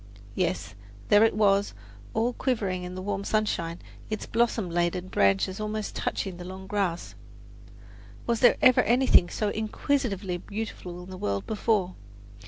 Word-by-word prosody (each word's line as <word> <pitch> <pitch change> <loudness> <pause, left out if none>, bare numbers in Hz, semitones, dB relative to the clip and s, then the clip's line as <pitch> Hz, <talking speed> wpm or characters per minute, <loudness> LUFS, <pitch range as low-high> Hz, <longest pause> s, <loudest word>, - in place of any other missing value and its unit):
Yes, 95 +3 -1 0.4
there 205 +1 +7
it 225 - +3
was, 200 -1 +2 0.4
all 230 +3 +1
quivering 210 -9 -1
in 180 0 -6
the 185 - -6
warm 200 0 -2
sunshine, 185 -6 -1 0.3
its 215 -1 -3
blossom 230 -3 +1
laden 175 +2 -1
branches 100 - +2
almost 215 0 -3
touching 190 -3 -3
the 175 - -8
long 190 +1 -8
grass. 190 -4 -2 1.1
Was 235 -1 0
there 245 -1 +6
ever 255 -1 +7
anything 240 -7 +4
so 210 - -1
exquisitely 215 -3 -1
beautiful 185 -3 -6
in 185 - -11
the 185 - -8
world 100 -1 -2
before! 210 -4 0
200 Hz, 145 wpm, -27 LUFS, 180-220 Hz, 1.1 s, there